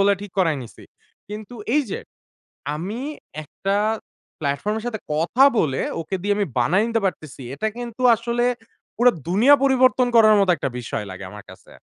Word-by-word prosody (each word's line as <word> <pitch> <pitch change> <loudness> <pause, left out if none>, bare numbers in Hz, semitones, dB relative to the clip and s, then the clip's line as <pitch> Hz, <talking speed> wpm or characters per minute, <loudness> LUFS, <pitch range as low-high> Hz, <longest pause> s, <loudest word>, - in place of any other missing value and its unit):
বলে, 200 +1 +5
ঠিক 205 -2 -9
করাই 165 -5 +2
নিসি। 115 - -13 0.4
কিন্তু 210 +3 -8 0.2
এই 300 - +4
যে, - - -3 0.7
আমি 190 +9 -5 0.4
একটা 195 +7 -3 0.6
প্ল্যাটফর্ম 145 +9 -1
এর 220 - -8
সাথে 220 -3 -3 0.2
কথা 175 - +3
বলে, 135 -4 +1 0.2
ওকে 165 +4 -3
দিয়ে 205 0 +1
আমি 205 - 0
বানায় 180 - +3
নিতে 230 -1 0
পারতেছি। 155 -7 -5
এটা 220 +10 -1
কিন্তু 240 0 -6
আসলে 235 +1 -1 0.5
পুরো 245 +2 +5 0.2
দুনিয়া 225 +11 +6
পরিবর্তন 255 -1 +4
করার 215 -2 +7
মতো 195 -2 +3
একটা 140 - -2
বিষয় 115 -3 -4
লাগে 95 +1 -8
আমার 105 0 -11
কাছে। - - -16
205 Hz, 165 wpm, -22 LUFS, 155-235 Hz, 0.7 s, করার